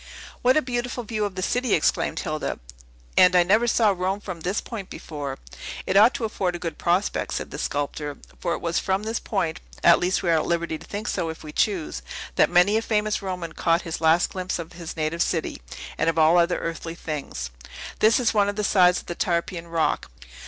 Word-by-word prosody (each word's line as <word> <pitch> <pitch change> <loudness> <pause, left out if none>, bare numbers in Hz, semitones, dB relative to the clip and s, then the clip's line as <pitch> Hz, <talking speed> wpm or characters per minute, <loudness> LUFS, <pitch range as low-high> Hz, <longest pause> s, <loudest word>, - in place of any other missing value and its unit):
"What 255 +4 +4
a 310 - +3
beautiful 245 0 -3
view 215 -1 -2
of 200 -2 -5
the 185 - -3
city!" 245 +2 +1
exclaimed 155 - +1
Hilda; 155 0 -3 0.6
"and 180 0 +6
I 180 - +7
never 215 +7 +3
saw 225 -2 +4
Rome 190 +1 -1
from 185 -4 -7
this 180 +6 -1
point 210 -6 -7
before." 145 -4 -6 0.5
"It 185 - -1
ought 220 +7 +7
to 255 -5 -2
afford 185 -4 -1
a - - -2
good 165 -1 -5
prospect," 180 +4 0
said - - -4
the - - -6
sculptor; 145 0 -3 0.2
"for 170 - -1
it - - -8
was 170 0 0
from 190 +2 0
this 225 +1 -2
point 175 -5 -2 0.2
at 170 - +7
least 185 +2 0
we 170 - +2
are 165 - +4
at - - -3
liberty 170 -2 -1
to - - -14
think 210 +3 -5
so, 165 - -1
if 160 - -7
we 155 - -8
choose 175 - 0 0.3
that - - +4
many 180 +5 +4
a - - +1
famous 215 -1 0
Roman 180 -4 -4
caught 170 +1 +1
his 165 -2 -5
last 160 +2 +4
glimpse 185 -1 -3
of 170 0 -7
his 170 -1 -8
native 160 +2 -1
city, 165 -2 -1 0.4
and 165 - +3
of 165 - -1
all 160 +2 +6
other 170 +1 +2
earthly 165 0 -4
things. 140 - -5 0.5
This 220 +4 +5
is 245 - +2
one 205 -2 +3
of 205 - -3
the 210 - -1
sides 180 -3 +4
of - - -21
the - - -4
Tarpeian 170 -1 -1
Rock. 165 -1 0
180 Hz, 220 wpm, -24 LUFS, 165-205 Hz, 0.6 s, I